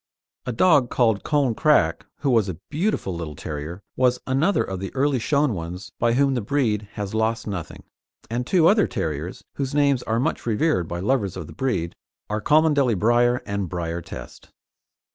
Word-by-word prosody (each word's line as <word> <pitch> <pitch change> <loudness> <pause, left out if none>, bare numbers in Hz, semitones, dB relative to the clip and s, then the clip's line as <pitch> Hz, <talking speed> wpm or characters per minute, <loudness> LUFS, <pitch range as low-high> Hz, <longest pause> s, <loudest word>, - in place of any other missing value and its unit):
A - - 0
dog 140 0 +4
called 110 -5 +2
Colne 145 -5 +1
Crack, 150 +6 +2
who 140 - +1
was 110 -5 +3
a 90 - -5
beautiful 160 - -1
little 80 -3 -5
terrier 75 +7 -6
was 125 -1 +3
another 140 +10 +2
of 95 -1 -5
the 95 0 -5
early 135 -1 +2
shown 140 +1 +1
ones 90 +1 -6
by 115 0 +2
whom 135 +2 +3
the 125 - -1
breed 105 -3 0
has 100 -1 -5
lost 110 +1 0
nothing, 95 -6 -6 0.4
and 120 +2 -3
two 175 -4 +4
other 210 +2 +4
terriers 85 - -4
whose 135 0 -2
names 140 -3 +3
are 115 0 -1
much 125 - -2
revered 115 - +1
by 85 +1 -4
lovers 105 -3 0
of - - -5
the - - -11
breed 120 -11 -2 0.4
are 105 0 -1
Cholmondeley 145 -5 +3
Briar 120 +4 +3
and 100 -3 -3
Briar 85 -1 -3
Test. - - -10
115 Hz, 180 wpm, -23 LUFS, 95-140 Hz, 0.4 s, dog